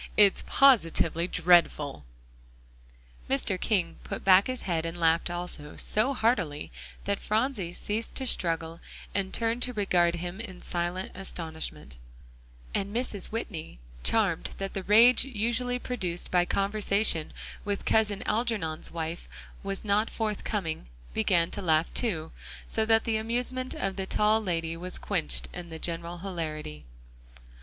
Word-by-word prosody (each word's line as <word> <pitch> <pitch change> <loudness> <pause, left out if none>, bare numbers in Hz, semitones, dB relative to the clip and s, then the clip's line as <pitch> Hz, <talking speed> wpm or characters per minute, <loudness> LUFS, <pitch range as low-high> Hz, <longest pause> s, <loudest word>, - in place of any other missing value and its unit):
It's 205 -2 +6
positively 170 -10 +4
dreadful!" 165 - +3 1.3
Mr. 185 +6 0
King 180 -7 0
put - - -6
back 190 +1 +6
his 255 -1 -4
head 165 -3 0
and 165 +1 -5
laughed 165 +1 +3
also; 175 -4 -5
so 250 +6 +1
heartily, 185 - 0 0.3
that 200 0 0
Phronsie 215 -5 -1
ceased 215 +5 -3
to 265 - -2
struggle, 165 -6 0 0.3
and 195 -1 -1
turned 230 +1 0
to 250 0 -1
regard 180 -5 +2
him 175 +3 -5
in 190 -6 -8
silent 175 +2 -3
astonishment; 160 - -6 0.8
and 195 +1 -1
Mrs. 230 -6 -1
Whitney, 170 - -5 0.2
charmed - - +1
that 195 0 -4
the 195 - -2
rage 225 +6 +6
usually 245 0 0
produced 185 -9 -3
by 180 -1 +4
conversation 200 -4 +1 0.3
with 205 -1 -3
Cousin 210 -2 +2
Algernon's 210 -8 -1
wife 165 0 -5 0.3
was 195 +1 -4
not 210 +2 +2
forthcoming, 210 - -2 0.3
began 170 +8 +2
to - - -3
laugh, 160 -2 +2
too, 165 -10 -1 0.4
so 220 - +2
that 225 0 +4
the 225 -1 0
amusement 250 +3 0
of 195 -1 -2
the 190 -1 -3
tall 215 +2 +3
lady 165 -4 -1
was 180 +2 -4
quenched 180 -6 +1
in 175 -1 -7
the 160 - -6
general 170 +1 -2
hilarity. 155 - -5
190 Hz, 135 wpm, -28 LUFS, 165-220 Hz, 1.3 s, It's